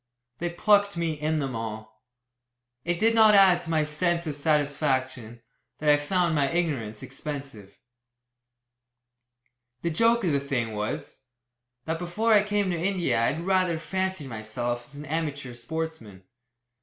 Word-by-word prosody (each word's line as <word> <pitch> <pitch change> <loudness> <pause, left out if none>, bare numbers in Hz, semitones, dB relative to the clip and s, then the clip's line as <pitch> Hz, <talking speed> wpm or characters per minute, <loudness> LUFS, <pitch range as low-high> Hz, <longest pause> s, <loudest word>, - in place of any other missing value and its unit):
They 175 - -1
"plucked" 200 +2 +2
me 170 -1 0
in 155 +1 -1
them 135 -4 -2
all. 110 -1 -7 0.8
It 175 0 -1
did 225 +1 +3
not 220 -2 +6
add 190 -3 +6
to 165 - -8
my 160 -2 +2
sense 170 +3 0
of 150 -3 -3
satisfaction, 135 -6 -1 0.3
that 150 -1 +3
I 145 - +5
found 170 +3 0
my 140 -3 +2
ignorance 140 -12 -2
expensive. 135 -7 -7 2.1
The 170 - 0
joke 230 +7 +3
of 175 - +2
the 140 - +2
thing 130 -5 -2
was, 130 +7 -5 0.6
that 160 +1 -2
before 210 +6 +1
I 210 - +7
came 205 -2 0
to - - 0
India 175 -12 +1
I - - +3
had 165 +3 -6
rather 185 -3 +2
fancied 185 -2 -3
myself 120 +1 -4
as 140 - -15
an 145 +1 -8
amateur 145 -4 -3
sportsman. 120 -6 -6
155 Hz, 150 wpm, -26 LUFS, 130-175 Hz, 2.1 s, I